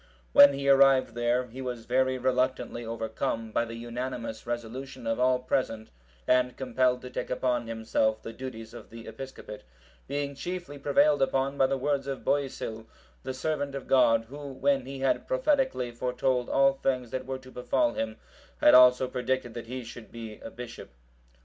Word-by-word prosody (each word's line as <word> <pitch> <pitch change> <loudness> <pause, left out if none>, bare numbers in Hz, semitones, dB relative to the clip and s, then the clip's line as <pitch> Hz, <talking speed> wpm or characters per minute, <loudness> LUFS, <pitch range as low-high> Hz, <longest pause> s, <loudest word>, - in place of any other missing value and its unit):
When 140 0 +9
he 140 0 -3
arrived 135 -1 +5
there, 120 +1 +1
he 125 +2 -9
was 125 -3 -5
very 130 +1 +1
reluctantly 130 -1 0
overcome 115 0 -3
by 115 - +1
the 115 0 -7
unanimous 120 -1 -5
resolution 120 +2 -5
of 115 +1 -1
all 130 0 +4
present, 125 -3 -2 0.4
and 125 - +2
compelled 125 -1 +1
to 125 - -8
take - - -4
upon 125 -2 0
himself 110 -1 0
the 115 - -8
duties 115 -3 -8
of 120 - -11
the 115 0 -10
episcopate; 130 -5 -9 0.5
being 140 0 -2
chiefly 175 -1 -6
prevailed 145 +1 +3
upon 135 +1 +1
by 135 -1 +3
the 135 - 0
words 140 0 -1
of 135 -1 -4
Boisil, 120 -5 -2 0.3
the - - -4
servant 140 +1 -2
of 140 - -5
God, 115 -4 +4
who, 145 +4 -9
when 135 -1 +1
he 135 0 -6
had 135 - +1
prophetically(752) 270 - +1
foretold 125 0 0
all 135 0 +4
things 130 -3 -2
that 130 0 -4
were 130 0 -3
to 130 0 -14
befall 295 - +1
him, 110 0 -3 0.4
had - - +6
also 125 0 +7
predicted 125 -1 -2
that 115 0 -7
he 125 +1 -5
should 115 -1 -11
be 110 -2 -8
a - - -8
bishop. 120 0 -9
130 Hz, 175 wpm, -28 LUFS, 120-135 Hz, 0.5 s, When